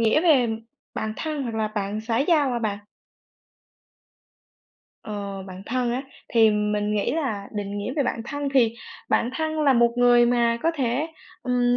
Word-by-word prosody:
nghĩa 230 Hz, +7 st, +4 dB
về 280 Hz, -8 st, +5 dB, 0.5 s
bạn 220 Hz, 0 st, -2 dB
thân 305 Hz, -3 st, -3 dB
hoặc 235 Hz, -3 st, -4 dB
là 215 Hz, -1 st, 0 dB
bạn 210 Hz, 0 st, -3 dB
xã 225 Hz, +1 st, -1 dB
giao 290 Hz, -3 st, +3 dB
hả 240 Hz, -, 0 dB
bạn? 210 Hz, -3 st, -2 dB, 2.3 s
Ờ, 200 Hz, -2 st, -5 dB
bạn 185 Hz, 0 st, -9 dB
thân 245 Hz, -1 st, 0 dB
á, 260 Hz, +2 st, -2 dB, 0.3 s
thì 225 Hz, -2 st, +5 dB
mình 210 Hz, 0 st, 0 dB
nghĩ 210 Hz, +4 st, 0 dB
là 225 Hz, -11 st, -2 dB
định 205 Hz, -1 st, -4 dB
nghĩa 205 Hz, +5 st, -3 dB
về 285 Hz, -, +3 dB
bạn 230 Hz, -, -2 dB
thân 285 Hz, +2 st, -3 dB
thì 230 Hz, -3 st, +4 dB, 0.3 s
bạn 240 Hz, -, +2 dB
thân 315 Hz, -1 st, -1 dB
là 280 Hz, -3 st, +5 dB
một 235 Hz, -1 st, +4 dB
người 240 Hz, -1 st, +5 dB
mà 235 Hz, -1 st, +2 dB
có 330 Hz, -, +3 dB
thể, 265 Hz, +2 st, 0 dB, 0.4 s
ừm, 245 Hz, -1 st, +2 dB
235 Hz, 175 wpm, -24 LUFS, 210-265 Hz, 2.3 s, về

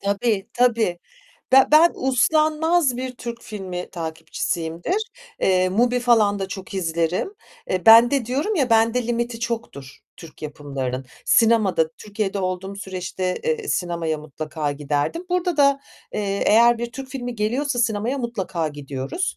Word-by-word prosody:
Tabii, 200 Hz, 0 st, 0 dB
tabii. 230 Hz, -7 st, +2 dB, 0.5 s
Be 265 Hz, 0 st, +8 dB
ben 325 Hz, +3 st, +7 dB
uslanmaz 305 Hz, +2 st, +2 dB
bir 255 Hz, 0 st, -4 dB
Türk 235 Hz, -1 st, -7 dB
filmi 185 Hz, -4 st, -6 dB
takipçisiyimdir, 165 Hz, -, -3 dB, 0.4 s
eee, 185 Hz, -1 st, +3 dB
MUBİ 245 Hz, +5 st, +2 dB
falan 220 Hz, -4 st, +3 dB
da 195 Hz, 0 st, -3 dB
çok 195 Hz, +2 st, -8 dB
izlerim. 170 Hz, -, -1 dB, 0.4 s
Eee, 185 Hz, +2 st, -1 dB
bende 235 Hz, +3 st, +7 dB
diyorum 290 Hz, -, -1 dB
ya 265 Hz, -8 st, +1 dB
bende 225 Hz, +2 st, +3 dB
limiti 235 Hz, -1 st, -2 dB
çoktur 225 Hz, -, -5 dB, 0.2 s
Türk 165 Hz, -2 st, -13 dB
yapımlarının. 135 Hz, -3 st, -5 dB, 0.2 s
Sinemada 215 Hz, -8 st, +3 dB
Türkiye'de 205 Hz, 0 st, -4 dB
olduğum 190 Hz, +1 st, -3 dB
süreçte, 185 Hz, -1 st, -4 dB
eee, 465 Hz, -3 st, -1 dB
sinemaya 170 Hz, -3 st, -1 dB
mutlaka 155 Hz, 0 st, -4 dB
giderdim. 145 Hz, -, -2 dB
Burada 360 Hz, -2 st, 0 dB
da, 280 Hz, -1 st, +4 dB, 0.3 s
eee, 200 Hz, -1 st, -2 dB
eğer 235 Hz, +2 st, +5 dB
bir 240 Hz, 0 st, -4 dB
Türk 270 Hz, +2 st, -7 dB
filmi 245 Hz, -2 st, -5 dB
geliyorsa 245 Hz, +5 st, -1 dB
sinemaya 230 Hz, +3 st, 0 dB
mutlaka 190 Hz, -9 st, -3 dB
gidiyoruz, 145 Hz, -, -4 dB
215 Hz, 135 wpm, -22 LUFS, 175-250 Hz, 0.5 s, Be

